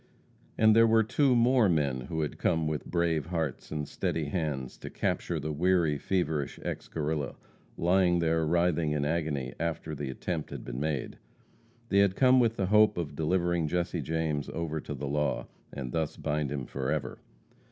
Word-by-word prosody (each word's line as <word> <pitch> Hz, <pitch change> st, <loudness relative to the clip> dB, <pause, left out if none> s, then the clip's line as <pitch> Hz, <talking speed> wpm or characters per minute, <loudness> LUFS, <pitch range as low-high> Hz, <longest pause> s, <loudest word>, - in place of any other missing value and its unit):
And 110 Hz, 0 st, +5 dB
there 115 Hz, 0 st, +7 dB
were 110 Hz, 0 st, +5 dB
two 130 Hz, +4 st, +2 dB
more 120 Hz, -2 st, +4 dB
men 70 Hz, -6 st, +1 dB
who 80 Hz, -2 st, -1 dB
had 75 Hz, -, -3 dB
come 80 Hz, -1 st, +1 dB
with 75 Hz, -1 st, -3 dB
brave 85 Hz, -4 st, 0 dB
hearts 80 Hz, -6 st, -3 dB
and 75 Hz, -1 st, -3 dB
steady 80 Hz, -2 st, -2 dB
hands 75 Hz, -7 st, -2 dB
to -, -, -7 dB
capture 85 Hz, -2 st, -1 dB
the 75 Hz, +1 st, -3 dB
weary, 80 Hz, -2 st, +2 dB
feverish 80 Hz, -5 st, -1 dB
ex -, -, -4 dB
Guerrilla, 75 Hz, -2 st, -2 dB, 0.4 s
lying 90 Hz, 0 st, +3 dB
there 80 Hz, -1 st, +1 dB
writhing 85 Hz, -1 st, +1 dB
in 75 Hz, -1 st, 0 dB
agony 75 Hz, -5 st, -1 dB
after 80 Hz, -1 st, -3 dB
the 70 Hz, -2 st, -4 dB
attempt 80 Hz, +4 st, -4 dB
had -, -, -7 dB
been -, -, -5 dB
made. 75 Hz, -2 st, -3 dB, 0.7 s
They 100 Hz, -, +4 dB
had 100 Hz, -1 st, +4 dB
come 130 Hz, -1 st, +5 dB
with 115 Hz, -2 st, +3 dB
the 95 Hz, -, 0 dB
hope 105 Hz, +1 st, +4 dB
of 75 Hz, -4 st, -3 dB
delivering 85 Hz, +1 st, +1 dB
Jesse 85 Hz, 0 st, -1 dB
James 80 Hz, -2 st, -2 dB
over 80 Hz, -2 st, -3 dB
to 75 Hz, -, -6 dB
the 70 Hz, -, -5 dB
law, 75 Hz, +1 st, -1 dB, 0.3 s
and 65 Hz, -3 st, -5 dB
thus 80 Hz, 0 st, -2 dB
bind 75 Hz, -2 st, -1 dB
him 70 Hz, -3 st, -3 dB
forever. 65 Hz, 0 st, -3 dB
80 Hz, 175 wpm, -29 LUFS, 75-90 Hz, 0.7 s, there